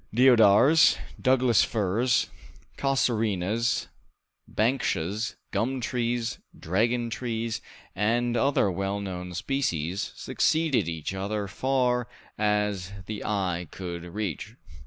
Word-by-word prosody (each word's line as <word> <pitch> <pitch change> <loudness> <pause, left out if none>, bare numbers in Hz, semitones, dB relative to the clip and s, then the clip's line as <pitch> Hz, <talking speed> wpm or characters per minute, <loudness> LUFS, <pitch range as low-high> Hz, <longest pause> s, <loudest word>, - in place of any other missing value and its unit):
Deodars, 125 +4 +6 0.2
Douglas 130 -3 +4
firs, 115 +4 +1 0.4
casuarinas, 115 -5 0 0.6
banksias, 110 -3 -1 0.2
gum 120 +6 -1
trees, 120 -1 -2 0.2
dragon 115 +7 0
trees, 115 -2 -3 0.3
and 120 +4 +1
other 120 -5 +2
well 100 +3 -2
known 90 -2 -6
species, 95 - -2
succeeded 150 - +1
each 80 +2 -4
other 100 +2 -3
far 125 +3 0 0.3
as 105 -3 0
the 105 0 -5
eye 90 -4 -1
could 85 -2 -6
reach. 100 +3 -5
110 Hz, 95 wpm, -27 LUFS, 95-120 Hz, 0.6 s, Deodars